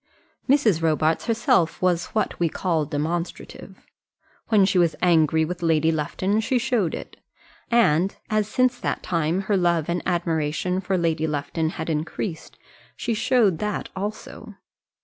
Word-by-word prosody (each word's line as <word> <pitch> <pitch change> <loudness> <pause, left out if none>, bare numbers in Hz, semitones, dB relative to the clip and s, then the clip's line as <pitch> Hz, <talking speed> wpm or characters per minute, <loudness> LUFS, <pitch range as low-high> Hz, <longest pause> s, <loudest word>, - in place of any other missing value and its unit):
Mrs. 230 - +3
Robarts 160 +2 +1
herself 220 -7 +2
was 180 -2 +1
what 220 - -2
we 170 -1 +2
call 165 -2 -1
demonstrative. 165 +4 -5 0.6
When 210 -4 +4
she 190 -1 +2
was 170 -2 +2
angry 160 -2 +3
with 175 +2 -6
Lady 160 -1 +2
Lufton 185 +7 -1
she 225 +4 0
showed 240 -9 0
it. - - -9 0.5
And 195 -6 +3
as 215 -2 0
since 255 +2 +1
that - - -3
time 170 +1 0
her 200 +1 0
love 170 -3 +1
and 175 +1 -1
admiration 170 +1 -1
for 190 0 -1
Lady 165 -2 0
Lufton 150 +2 -2
had 160 - -4
increased, 160 +2 -4 0.4
she 235 - -2
showed 220 -6 +2
that 210 -1 -3
also. 205 +3 -6
175 Hz, 145 wpm, -23 LUFS, 160-205 Hz, 0.6 s, When